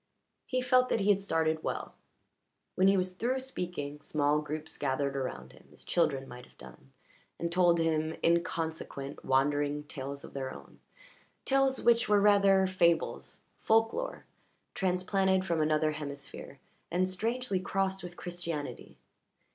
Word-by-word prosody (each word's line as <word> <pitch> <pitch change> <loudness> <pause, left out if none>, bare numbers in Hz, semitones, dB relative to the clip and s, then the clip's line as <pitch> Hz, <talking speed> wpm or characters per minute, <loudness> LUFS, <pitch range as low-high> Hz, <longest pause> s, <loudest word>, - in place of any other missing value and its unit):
He 255 0 0
felt 255 0 +4
that 225 - +1
he 200 - +1
had 200 -1 +2
started 160 -4 0
well; - - -4 0.8
when 190 - +3
he 195 0 +5
was 185 0 -1
through 245 +7 -1
speaking 175 - -5
small 150 0 +1
groups 155 +1 -5
gathered 140 0 -1
around 70 - -4
him - - -18
as - - -11
children 140 -6 0
might 125 0 -11
have - - -26
done, 65 +1 -14 0.5
and 170 0 -3
told 175 -1 +4
him 160 -1 0
inconsequent, 160 -4 -1
wandering 145 +2 +1
tales 140 -1 -6
of - - -11
their 135 -1 -4
own - - -13 0.7
tales 270 -1 +2
which 235 -1 +4
were 205 -1 +5
rather 200 -2 +5
fables, 170 -3 0 0.2
folklore 225 - +1 0.5
transplanted 190 0 +1
from 170 -3 0
another 155 0 +2
hemisphere 140 -2 -8 0.3
and 180 +2 +1
strangely 225 +2 -1
crossed 190 0 -1
with 175 -1 -9
Christianity. 170 -4 -6
170 Hz, 140 wpm, -31 LUFS, 145-195 Hz, 0.8 s, he